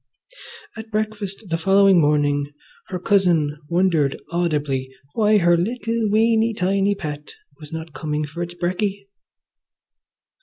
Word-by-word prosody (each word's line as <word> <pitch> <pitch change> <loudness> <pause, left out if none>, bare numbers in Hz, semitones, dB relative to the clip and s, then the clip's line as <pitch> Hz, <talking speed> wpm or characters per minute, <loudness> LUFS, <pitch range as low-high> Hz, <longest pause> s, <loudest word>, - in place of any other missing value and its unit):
At 220 0 -9
breakfast 215 -1 -3
the 165 0 -1
following 195 0 +5
morning 145 -1 +1 0.4
her 185 - -4
cousin 175 -7 +2
wondered 170 -5 +1
audibly 145 -6 -1 0.2
why 215 -1 +3
her 175 -3 +4
little, 225 +4 -1
weeny, 225 +1 +2
tiny 195 +1 +1
pet 150 -5 -7 0.2
was 150 -2 -12
not 160 -1 -7
coming 150 +2 -3
for 155 +4 -7
its 175 0 -5
brecky. 195 +3 -2
175 Hz, 120 wpm, -21 LUFS, 150-205 Hz, 0.4 s, following